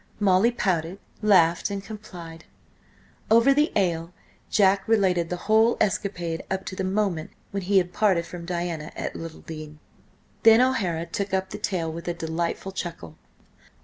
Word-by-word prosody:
Molly 195 +2 +4
pouted, 185 -6 -1 0.2
laughed 180 -5 +4
and 200 -1 -4
complied. 175 -7 -10 0.8
Over 230 +5 +6
the 295 +3 +2
ale 170 -4 0 0.4
Jack 195 -1 +3
related 185 -6 +2
the 180 - -2
whole 220 +2 +4
escapade 180 -5 -1
up 190 0 -2
to 185 - -5
the 190 - -3
moment 185 -4 -1 0.2
when 200 - -2
he 195 +2 +2
had 180 -1 +2
parted 190 -5 +2
from 175 -1 -8
Diana 170 -3 -3
at - - -4
Littledean. 155 -2 -8 0.6
Then 225 0 +7
O'Hara 200 -11 +1
took 200 +2 -2
up 190 0 -2
the - - -6
tale 165 -5 -2
with 170 +1 -8
a 175 - -1
delightful 170 +3 -3
chuckle. 170 - -6
185 Hz, 150 wpm, -25 LUFS, 170-205 Hz, 0.8 s, Then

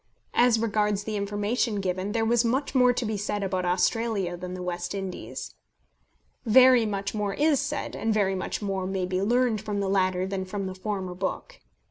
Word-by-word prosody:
As 240 -1 +4
regards 210 -2 0
the 215 0 -4
information 205 +2 -1
given, 185 +1 -2
there 225 +1 0
was 235 +1 +3
much 260 +5 0
more 250 -2 +5
to 245 0 -2
be 215 -1 -2
said 205 0 -2
about 185 -1 -1
Australia 195 0 0
than 180 +1 -6
the 180 - -6
West 175 +1 -3
Indies. 180 - -6 0.9
Very 250 0 +6
much 200 -1 -3
more 205 -2 -2
is 295 -2 +3
said, 285 +1 -3
and 225 - -1
very 205 -3 +2
much 190 +2 -3
more 190 -2 -2
may 190 -1 -1
be 185 +1 -1
learned 235 0 +2
from 210 -2 -3
the 200 - -1
latter 185 -1 +1
than 190 0 -3
from 195 +1 -4
the 190 - -4
former 185 -1 -4
book. 185 +1 -4
205 Hz, 190 wpm, -26 LUFS, 185-225 Hz, 0.9 s, Very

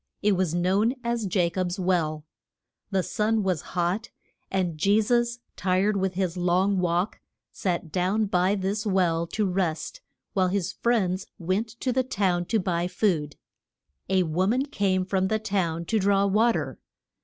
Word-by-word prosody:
It 210 - +4
was 185 -4 +1
known 195 +8 +2
as 235 -3 -1
Ja 175 -3 +3
cob's 180 0 -2
Well. 160 -5 0 0.6
The 190 -2 +1
sun 215 +2 0
was 185 -6 0 0.2
hot, 180 +6 0 0.4
and 185 -4 -1
Je 200 +7 +3
sus, 240 +2 +1 0.2
tired 190 +3 +1
with 190 -1 -1
his 185 -2 -1
long 185 +2 +2
walk, 175 +3 0 0.3
sat 170 -4 -2
down 190 +5 +1
by 190 0 +2
this 200 +2 -2
well 175 -5 +1
to 215 +4 -1
rest, 185 - -2 0.3
while 185 -3 +2
his 185 -1 -1
friends 195 -6 0
went 185 +6 -1
to 255 - 0
the 260 - +3
town 190 -8 0
to 225 - +1
buy 175 -2 0
food. 180 -6 0 0.7
A 190 -1 +3
wo 175 +3 0
man 255 +6 +1
came 195 -9 0
from 190 0 +1
the 220 - +1
town 180 -6 -1
to 220 +5 +1
draw 200 0 +3
wa 215 +4 +4
ter. - - -4
190 Hz, 165 wpm, -26 LUFS, 180-210 Hz, 0.7 s, It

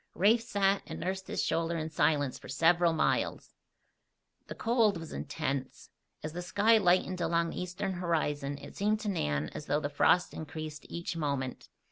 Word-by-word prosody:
Rafe 215 +6 +4
sat 200 -4 +1
and - - -6
nursed 190 +1 -3
his - - -1
shoulder 165 0 0
in 160 0 -4
silence 145 -4 +1
for - - -12
several 165 +4 +4
miles. 160 - 0 0.9
The - - -7
cold 225 -4 +2
was 165 -1 -8
intense. 140 -4 -4 0.3
As 155 0 -4
the 175 - -4
sky 210 +5 +4
lightened 185 -1 +2
along 170 0 +1
the - - -4
eastern 180 +2 -3
horizon 150 -5 -1
it - - -11
seemed 210 +2 +1
to 210 - -2
Nan 75 - -1
as 150 - -8
though 145 +2 +2
the 145 -1 -3
frost 170 +4 +3
increased 155 -1 -7
each 170 0 -4
moment. 140 -5 -3
170 Hz, 170 wpm, -31 LUFS, 150-190 Hz, 0.9 s, Rafe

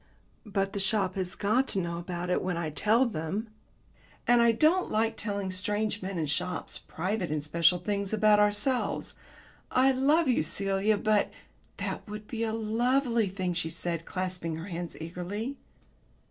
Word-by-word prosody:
"But 195 -1 -1
the 200 - -2
shop 195 -1 +2
has 185 -1 -3
got 220 +6 +2
to 195 - 0
know 170 -1 -2
about 175 0 -4
it - - +2
when 180 -2 -2
I 165 -2 -2
tell 220 - +3
them. 200 +2 -3 0.8
And 240 0 +6
I 235 0 +6
don't 315 +10 +3
like 225 +1 +1
telling 200 -3 -3
strange 205 +3 -1
men 190 0 -4
in 160 - 0
shops 180 +4 -2
private 185 +2 -3
and 150 -1 -1
special 165 +3 +3
things 200 +2 -2
about 215 -1 +5
ourselves. 210 +5 +2 0.6
I 260 +1 +4
love 285 +5 +3
you, 250 - +3
Celia, 195 +5 +1
but 210 0 +2 0.2
" - - -36
"That - - -4
would 210 0 -7
be 230 -2 -3
a 225 - 0
lovely 230 +1 +1
thing," 185 -2 -2
she 170 -2 -2
said, 170 0 -3
clasping 180 -3 -3
her 165 +5 -7
hands 175 -1 -5
eagerly. 180 - -4
200 Hz, 170 wpm, -29 LUFS, 180-220 Hz, 0.8 s, And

